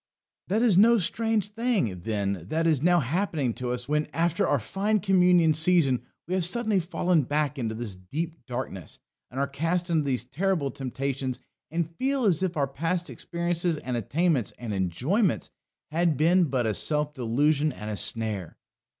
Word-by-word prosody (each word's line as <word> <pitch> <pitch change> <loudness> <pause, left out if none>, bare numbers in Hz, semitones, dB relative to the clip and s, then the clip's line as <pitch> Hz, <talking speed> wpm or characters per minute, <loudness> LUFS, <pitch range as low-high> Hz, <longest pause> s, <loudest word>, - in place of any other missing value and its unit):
That 215 +5 +1
is 205 -7 +5
no 230 +3 +6
strange 220 +2 0
thing, 210 - -1
then, 100 -3 -2
that 165 +1 0
is 155 -5 +3
now 175 +1 +4
happening 145 - -1
to 125 +1 -4
us, 125 0 -3
when, 150 +1 0
after 170 0 +1
our 145 - +3
fine 200 - 0
communion 180 -4 +4
season, 155 -5 +3 0.3
we 180 - -3
have 185 -1 +1
suddenly 215 +2 +1
fallen 175 -1 +1
back 145 +1 -1
into 110 -2 -2
this 110 -4 -5 0.2
deep 165 +2 -3
darkness, 120 - -5 0.3
and 130 - -6
are 140 - +2
cast 165 +5 -1
into 160 -2 +2
these 130 -3 -1
terrible 150 +1 -1
temptations, 130 0 -3 0.3
and 165 0 -3
feel 270 -1 0
as 185 -4 +3
if 180 -3 -1
all - - +1
our 140 - +2
past 165 +6 -2
experiences 170 -1 -1
and 125 -3 -4
attainments 140 - 0
and 115 -3 -5
enjoyments 125 - 0 0.4
had 165 -2 +1
been 175 +4 +4
but 130 -5 -1
a 110 - +1
self 150 +5 -1
delusion 145 +4 +1
and 110 -4 -6
a - - -2
snare. 105 -4 -1
155 Hz, 175 wpm, -27 LUFS, 125-180 Hz, 0.4 s, no